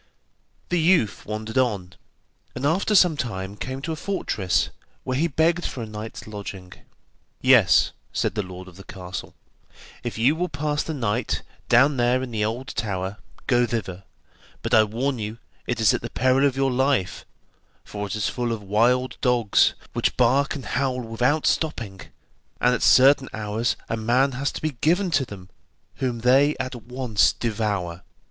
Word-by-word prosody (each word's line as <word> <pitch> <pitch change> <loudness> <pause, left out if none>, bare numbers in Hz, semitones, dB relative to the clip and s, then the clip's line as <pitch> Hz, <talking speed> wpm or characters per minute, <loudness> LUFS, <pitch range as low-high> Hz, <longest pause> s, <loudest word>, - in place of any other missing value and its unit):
The 175 - +1
youth 160 - +2
wandered 110 +3 -2
on, 100 -8 -1 0.6
and 125 +3 -3
after 185 +7 +2
some 180 -5 +6
time 100 -7 -4
came 130 +5 -6
to 165 - -3
a - - -2
fortress 130 - -1 0.3
where 130 - -2
he 160 +6 +2
begged 165 +3 +1
for 120 - -4
a - - -4
night's 110 +1 -8
lodging. 100 -3 -8 0.7
'Yes,' - - +5 0.2
said - - -1
the 105 - -1
lord 95 -1 -9
of 90 -1 -14
the 100 - -11
castle, 90 -2 -8 0.7
'if - - -5
you 125 +7 +3
will 180 +2 -2
pass 145 +1 -1
the 160 - -4
night 120 -2 -1 0.3
down 130 +4 +5
there 125 +1 +2
in 125 - -6
the 110 -2 -1
old 120 +5 -3
tower, 95 -4 -3 0.3
go 120 -2 +3
thither; 95 -5 -4 0.6
but - - -3
I 110 -1 +7
warn 125 +5 -2
you, 110 +1 -5 0.3
it 120 -2 -1
is 110 -3 +4
at - - -1
the 120 - -5
peril 130 +3 +3
of 135 -1 -3
your 135 -1 +2
life, 130 -6 0 0.6
for 105 0 -5
it 100 - -4
is 105 - -1
full 120 -1 -2
of 110 -3 -4
wild 120 +6 +2
dogs, 120 -5 +3 0.2
which - - 0
bark 135 +4 +3
and 135 - -7
howl 130 -2 -1
without 125 +6 0
stopping, 115 - -1 0.6
and 125 0 +3
at - - -1
certain 135 +1 +5
hours 110 +2 -1
a 115 - -2
man 125 +5 +2
has 135 +3 -2
to - - -7
be 155 - 0
given 180 +4 +2
to 145 -4 +2
them, 95 -4 -11 0.5
whom 125 -4 -2
they 135 +5 +4
at 130 0 -3
once 120 -2 +1
devour. 100 -6 -2
120 Hz, 175 wpm, -24 LUFS, 105-135 Hz, 0.7 s, I